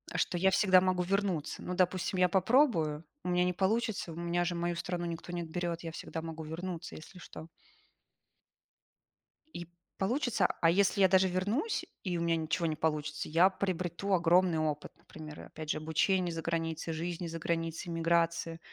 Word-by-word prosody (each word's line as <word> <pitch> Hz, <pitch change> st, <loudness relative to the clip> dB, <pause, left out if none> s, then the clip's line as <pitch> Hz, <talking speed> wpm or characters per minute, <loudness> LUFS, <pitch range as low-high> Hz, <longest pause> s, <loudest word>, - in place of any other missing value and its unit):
Что 180 Hz, -, 0 dB
я 190 Hz, +2 st, +4 dB
всегда 185 Hz, -1 st, +5 dB
могу 185 Hz, -1 st, +1 dB
вернуться. 185 Hz, -4 st, -1 dB
Ну, 180 Hz, -, -4 dB
допустим, 185 Hz, +1 st, +1 dB
я 180 Hz, -, +5 dB
попробую, 185 Hz, -, +3 dB, 0.2 s
у -, -, -3 dB
меня 180 Hz, 0 st, +3 dB
не 180 Hz, 0 st, +1 dB
получится, 200 Hz, 0 st, 0 dB
у -, -, -8 dB
меня 170 Hz, +1 st, 0 dB
же 175 Hz, -, -1 dB
мою 170 Hz, 0 st, -1 dB
страну 175 Hz, 0 st, -3 dB
никто 170 Hz, +1 st, -5 dB
не 175 Hz, -1 st, -3 dB
отберёт, 170 Hz, 0 st, -3 dB
я 165 Hz, -, -5 dB
всегда 160 Hz, 0 st, -6 dB
могу 160 Hz, 0 st, -6 dB
вернуться, 170 Hz, +2 st, -6 dB
если 160 Hz, +4 st, -12 dB
что. 160 Hz, -2 st, -10 dB, 2.1 s
И 175 Hz, -1 st, -6 dB, 0.3 s
получится, 225 Hz, -2 st, +1 dB
а 165 Hz, -, +5 dB
если 200 Hz, +3 st, +3 dB
я 190 Hz, -, +8 dB
даже 190 Hz, 0 st, +4 dB
вернусь, 205 Hz, -, -1 dB, 0.2 s
и 180 Hz, -3 st, -1 dB
у -, -, -2 dB
меня 170 Hz, 0 st, +2 dB
ничего 160 Hz, +1 st, -1 dB
не 160 Hz, -1 st, 0 dB
получится, 155 Hz, 0 st, -2 dB
я 170 Hz, +4 st, +5 dB
приобрету 185 Hz, -1 st, -2 dB
огромный 175 Hz, -1 st, +4 dB
опыт. 150 Hz, -1 st, -2 dB
Например, 155 Hz, -1 st, -10 dB
опять 155 Hz, -1 st, -9 dB
же -, -, +1 dB
обучение 170 Hz, +4 st, +1 dB
за 165 Hz, -, -4 dB
границей, 165 Hz, 0 st, -2 dB
жизни 170 Hz, +2 st, -4 dB
за 165 Hz, 0 st, -5 dB
границей, 165 Hz, +1 st, -2 dB
эмиграции. 165 Hz, 0 st, +1 dB
170 Hz, 175 wpm, -31 LUFS, 165-185 Hz, 2.1 s, я